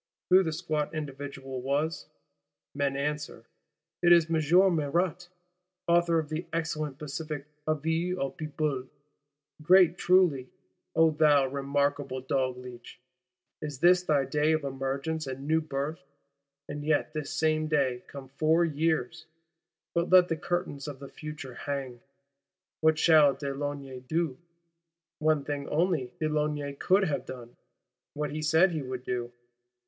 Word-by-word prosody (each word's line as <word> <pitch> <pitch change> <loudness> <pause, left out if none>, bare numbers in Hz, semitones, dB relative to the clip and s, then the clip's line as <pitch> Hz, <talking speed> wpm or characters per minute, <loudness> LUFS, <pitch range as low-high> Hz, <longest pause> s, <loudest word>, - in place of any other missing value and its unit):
Who 185 +1 +8
the 165 -4 -1
squat 155 -2 -2
individual 135 -3 -6
was? 145 +5 -1 0.7
Men 140 -1 -1
answer, 150 -4 -3 0.6
it 175 - +5
is 165 -1 +5
M. 170 +4 +4
Marat, 170 +4 -1 0.6
author 170 -1 +3
of 155 -2 -2
the 160 +2 -4
excellent 155 -4 -2
pacific 150 0 -5 0.2
Avis 160 +4 0
au 135 -5 -2
Peuple! 150 -4 -3 0.7
Great 180 +1 +5
truly, 175 -9 +3 0.5
O 160 0 +5
thou 150 -2 +4
remarkable 140 0 -1
Dogleech, 125 -2 -4 0.6
is 150 -3 -5
this 175 +5 +5
thy 150 -6 +1
day 150 +3 +1
of 155 -1 0
emergence 135 +3 -3
and 135 +2 -6
new 160 +1 +3
birth: 145 0 -4 0.6
and 145 0 -6
yet 155 0 0
this 150 -2 -4
same 155 0 +1
day 135 -5 0
come 140 -2 -9
four 155 +5 +2
years—!—But 160 +2 -3
let 180 -1 +6
the 165 - +1
curtains 155 -3 -3
of 145 -2 -6
the 140 0 -10
future 150 -4 -8
hang. 130 -2 -5 0.8
What 160 0 +3
shall 155 -4 +5
de 140 0 -4
Launay 140 -2 -5
do? 145 +1 -2 0.8
One 155 -2 +2
thing 145 -1 -4
only 155 -6 0
de 155 - 0
Launay 150 -2 -1
could 190 +7 +2
have 155 -6 -2
done: 120 -2 -9 0.6
what 150 0 -2
he 155 +1 -4
said 160 +5 +4
he 160 -3 -2
would 130 -1 -6
do. 120 -1 -3
150 Hz, 135 wpm, -28 LUFS, 140-160 Hz, 0.8 s, Who